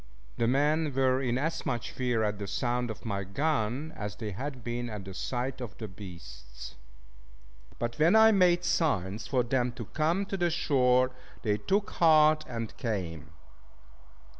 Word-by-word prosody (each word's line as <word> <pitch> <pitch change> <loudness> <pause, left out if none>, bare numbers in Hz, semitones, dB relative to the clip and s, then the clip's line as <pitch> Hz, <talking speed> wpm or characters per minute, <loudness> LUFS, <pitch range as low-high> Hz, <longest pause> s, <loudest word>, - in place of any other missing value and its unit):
The 115 - +1
men 150 +4 +2
were 130 0 +2
in 125 -2 0
as 160 +5 -2
much 125 -6 -3
fear 125 -3 0
at 105 -1 -1
the 100 - -4
sound 120 +5 -1
of 110 - -7
my 100 -3 -2
gun, 140 +5 -1
as 105 -2 -5
they 110 -3 -5
had 130 +4 -6
been 120 +1 -3
at 105 -3 -6
the 95 - -8
sight 125 +7 -3
of 115 -6 -7
the 110 - -5
beasts. 65 - -10 1.0
But 120 +2 -3
when 165 +7 +5
I 220 0 +8
made 180 -3 +4
signs 110 - 0
for 130 -3 +2
them 125 0 0
to 120 -3 -7
come 165 - 0
to 195 0 -4
the 175 -1 +2
shore, 130 -5 +3 0.3
they 105 -3 +1
took 200 - 0
heart, 155 -2 +5
and 115 -2 -5
came. 90 - -3
125 Hz, 165 wpm, -29 LUFS, 105-150 Hz, 1.0 s, I